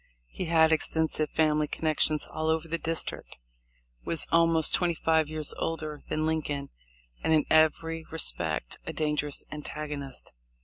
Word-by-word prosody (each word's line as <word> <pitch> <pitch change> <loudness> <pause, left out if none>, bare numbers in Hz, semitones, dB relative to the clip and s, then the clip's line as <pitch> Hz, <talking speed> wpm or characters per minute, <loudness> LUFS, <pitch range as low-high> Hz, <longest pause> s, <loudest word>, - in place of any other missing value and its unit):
He 185 - -4
had 160 -1 +4
extensive 160 -1 +1
family 155 -1 +2
connections 155 0 +1
all 155 0 -4
over 160 +1 0
the 165 +1 -2
district, 165 0 -4 0.7
was 165 - 0
almost 165 -1 +4
twenty 175 -2 +2
five 160 -1 +2
years 155 -1 0
older 155 -2 -3
than 155 0 0
Lincoln, 145 -3 -2 0.5
and - - +1
in 155 - +3
every 160 +1 +3
respect 80 - -1
a - - -3
dangerous 150 -2 -1
antagonist. 150 -3 -6
155 Hz, 135 wpm, -28 LUFS, 150-160 Hz, 0.7 s, had